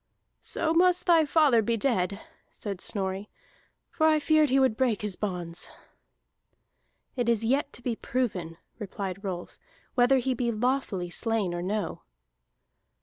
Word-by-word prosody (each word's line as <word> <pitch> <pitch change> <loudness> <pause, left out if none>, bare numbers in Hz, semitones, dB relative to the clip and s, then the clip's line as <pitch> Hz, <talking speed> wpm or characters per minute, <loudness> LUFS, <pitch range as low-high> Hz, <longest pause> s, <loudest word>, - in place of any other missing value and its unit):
"So 320 0 -1
must 360 +1 +3
thy 330 -3 +5
father 285 -7 +4
be 230 +2 0
dead," 200 -5 0 0.3
said 200 -3 -6
Snorri. 195 0 -1 0.6
"For 315 -2 +2
I 310 -1 +4
feared 310 0 +3
he 270 +2 +3
would 260 -5 +3
break 230 -4 0
his 205 -3 -1
bounds." 180 -4 -4 1.5
"It 245 -2 0
is 230 -1 +3
yet 280 +4 +1
to 240 - -7
be 240 -2 -1
proven," 190 -11 -3 0.2
replied 195 -1 -5
Rolf, 180 -3 -6 0.3
"whether 250 +1 +4
he 260 +1 0
be 240 -1 -1
lawfully 220 -6 -1
slain 220 -4 -1
or 175 - -3
no." 200 0 -3
230 Hz, 145 wpm, -27 LUFS, 195-270 Hz, 1.5 s, thy